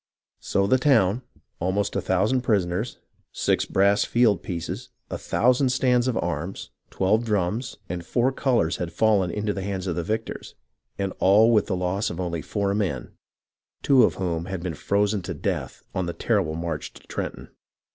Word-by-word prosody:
So 100 - 0
the 130 +6 +3
town, 120 -5 +3 0.4
almost 95 +4 -1
a - - +1
thousand 105 +8 +1
prisoners, 105 -1 0 0.3
six - - +1
brass 100 +2 +3
field 110 -7 +3
pieces, 85 -3 -5 0.2
a - - -2
thousand 130 +2 +2
stands 125 -1 +2
of 125 -3 0
arms, 80 +6 -3 0.2
twelve 110 +5 +1
drums, 105 +2 -1
and 85 0 -4
four 120 +8 +1
colours 120 - +1
had 85 -1 -4
fallen 100 -1 +2
into 105 +3 -1
the 95 - -4
hands 95 -1 -3
of 90 -3 -2
the 85 - -1
victors, 110 +6 -4 0.4
and 95 -1 -2
all 105 +5 +6
with 105 - +3
the 95 - 0
loss 90 +3 -1
of 85 - -6
only 85 -3 -2
four 100 +4 -1
men, 95 - -2 0.7
two 135 -2 +6
of - - +4
whom 85 -3 -2
had 95 -2 -5
been 90 -3 -2
frozen 100 +5 0
to 90 -1 -5
death - - -3
on 95 -2 -1
the 85 - -3
terrible 95 -9 0
march 80 -2 -4
to - - -16
Trenton. - - -5
100 Hz, 175 wpm, -25 LUFS, 90-110 Hz, 0.7 s, all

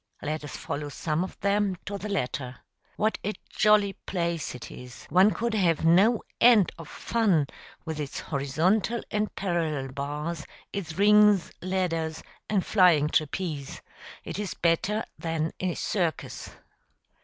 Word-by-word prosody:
Let 155 +1 -2
us 145 - -7
follow 145 0 -4
some 155 +3 -1
of 185 - -8
them 200 -1 +1
to 200 0 -4
the 210 - -5
latter. 130 -8 -2 0.4
What 215 +1 0
a 210 - -1 0.2
jolly 210 -2 +4
place 170 -8 -3
it 125 - -9
is! 125 0 -11
One 185 +3 +6
could 230 +1 -2
have 170 -6 +2
no 200 +8 +5 0.2
end 230 -6 +6
of 165 - -8
fun 200 -10 +1 0.4
with 160 -2 -4
its 145 -2 -4
horizontal 170 - 0
and 210 0 -1
parallel 160 -8 -1
bars, 150 +4 -4 0.3
its 175 -5 -5
rings, 210 -2 +5
ladders, 165 -4 -1 0.3
and 200 -4 +1
flying 175 -7 +4
trapeze: 155 -2 -2 0.4
it - - -5
is 205 -3 -3
better 180 +6 +1
than 165 -1 -1
a 185 -2 -1
circus. 175 -6 -2
175 Hz, 140 wpm, -27 LUFS, 155-205 Hz, 0.4 s, One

